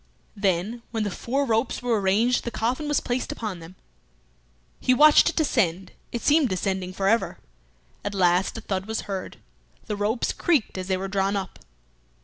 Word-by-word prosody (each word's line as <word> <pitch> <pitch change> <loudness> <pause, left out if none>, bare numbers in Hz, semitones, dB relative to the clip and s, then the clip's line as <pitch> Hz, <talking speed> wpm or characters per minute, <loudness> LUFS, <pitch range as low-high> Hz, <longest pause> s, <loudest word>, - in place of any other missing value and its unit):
Then 200 +4 0
when 225 -2 -2
the 205 - -2
four 270 +9 -1
ropes 230 +1 0
were 230 -4 +1
arranged 215 +6 +2
the - - -3
coffin 245 +6 -2
was 295 -1 +2
placed 245 +1 -2
upon 210 -6 -5
them. 165 +3 -12 1.0
He 255 - +3
watched 300 +4 +7
it - - -6
descend; 195 - 0 0.2
it 235 - -4
seemed 295 -3 +4
descending 185 0 -2
for 195 +1 -2
ever. 225 +3 +1 0.7
At 205 0 -3
last 180 +2 +2
a - - -6
thud 195 -2 -3
was 220 0 -2
heard; 190 -2 -6 0.5
the 210 - -3
ropes 210 +4 0
creaked 310 -10 +1
as 185 - -5
they 190 -1 +1
were 190 +1 -4
drawn 195 +1 0
up. 195 -2 -4
210 Hz, 175 wpm, -25 LUFS, 190-245 Hz, 1.0 s, watched